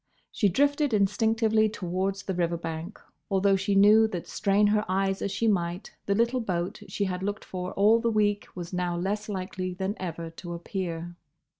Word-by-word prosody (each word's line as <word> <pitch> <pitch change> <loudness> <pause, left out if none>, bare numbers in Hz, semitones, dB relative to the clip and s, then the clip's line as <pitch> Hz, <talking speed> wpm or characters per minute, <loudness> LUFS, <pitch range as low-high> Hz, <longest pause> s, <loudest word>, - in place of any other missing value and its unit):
She 205 - +2
drifted 285 - +2
instinctively 220 +2 +2
towards 190 0 -2
the 190 - -3
river 170 -1 0
bank 165 +4 -6 0.3
although 195 0 +3
she 195 +1 0
knew 210 +3 +7
that 180 -6 -5
strain 200 +1 +2
her 210 +1 +3
eyes 195 +1 0
as 200 - -1
she 230 - 0
might 175 -2 -1 0.2
the 200 - +2
little 235 +4 +2
boat 180 -2 -3
she 205 - -2
had 185 -2 -2
looked 205 +2 -3
for 180 -1 -5
all 215 +3 +5
the 230 0 +1
week 205 -2 +1
was 175 0 -7
now 180 -1 -1
less 205 +4 -2
likely 185 -2 -4
than 190 +2 -2
ever 165 -2 -5
to 170 +1 -8
appear. 175 -1 -5
195 Hz, 180 wpm, -27 LUFS, 180-210 Hz, 0.3 s, knew